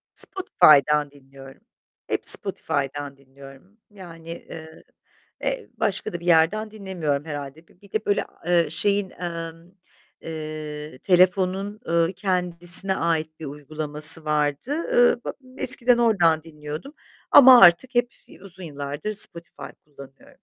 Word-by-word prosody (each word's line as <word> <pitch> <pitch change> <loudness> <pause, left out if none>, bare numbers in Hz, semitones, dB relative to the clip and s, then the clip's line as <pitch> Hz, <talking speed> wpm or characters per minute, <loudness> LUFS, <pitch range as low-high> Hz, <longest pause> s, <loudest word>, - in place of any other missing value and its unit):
Spotify'dan 150 - +2
dinliyorum. 135 0 -16 0.5
Hep - - -4
Spotify'dan 145 -7 -3
dinliyorum. 135 +7 -17
Yani, 165 -5 -13
eee, 160 -1 -11 0.6
eee, - - -4
başka 215 -1 -3
da 175 - -5
bir 170 - -13
yerden 180 +6 +1
dinlemiyorum 175 -9 -4
herhâlde. 145 +1 -9
Bir 180 - -28
bir 200 - -20
de 215 0 -3
böyle, 205 - -1 0.2
eee, 175 -1 +1
şeyin, 200 +5 -1
emm, 165 -1 -8 0.5
eee, 155 -2 -8
telefonun, 185 +2 +1
ııı, 170 +1 0
kendisine 180 0 +1
ait 160 -1 -3
bir 160 - -8
uygulaması 150 +2 +2
vardı. 150 - -2 0.3
Iıı, - - +3
b - - -4 0.3
eskiden 245 -1 +7
oradan 175 -9 +2
dinliyordum 155 - -10 0.4
ama 255 -3 +8
artık 195 +9 +4
hep 240 0 +1 0.3
uzun 190 -1 -14
yıllardır 145 +5 -6
Spotify 170 -4 -6 0.2
kullanıyorum. 140 -2 -16
165 Hz, 120 wpm, -22 LUFS, 150-195 Hz, 0.6 s, ama